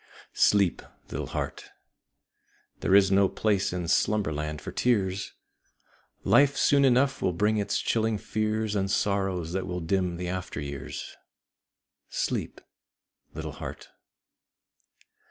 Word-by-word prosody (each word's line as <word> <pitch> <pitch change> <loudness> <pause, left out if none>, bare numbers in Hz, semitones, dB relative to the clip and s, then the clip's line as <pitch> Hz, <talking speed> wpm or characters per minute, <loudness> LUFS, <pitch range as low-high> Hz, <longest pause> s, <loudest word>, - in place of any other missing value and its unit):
Sleep, 100 -4 +3 0.3
little - - -3
heart! - - -5 1.1
There 95 - +3
is 100 -1 +6
no 100 0 +4
place 100 -3 0
in 90 -1 -3
Slumberland 75 -7 0
for - - -7
tears: 100 -5 0 0.9
Life 140 -1 +4
soon 140 -1 +4
enough 130 +1 +3
will 90 - +1
bring 105 +5 +1
its 105 -1 0
chilling 110 -1 0
fears 110 0 -1
And 95 -1 0
sorrows 95 -4 0
that 95 0 -2
will 90 -1 -3
dim 90 0 -1
the 90 0 -4
after 90 -3 -4
years. 70 -2 -6 0.9
Sleep, - - -3 0.7
little - - -5
heart! - - -8
95 Hz, 120 wpm, -27 LUFS, 90-110 Hz, 1.1 s, is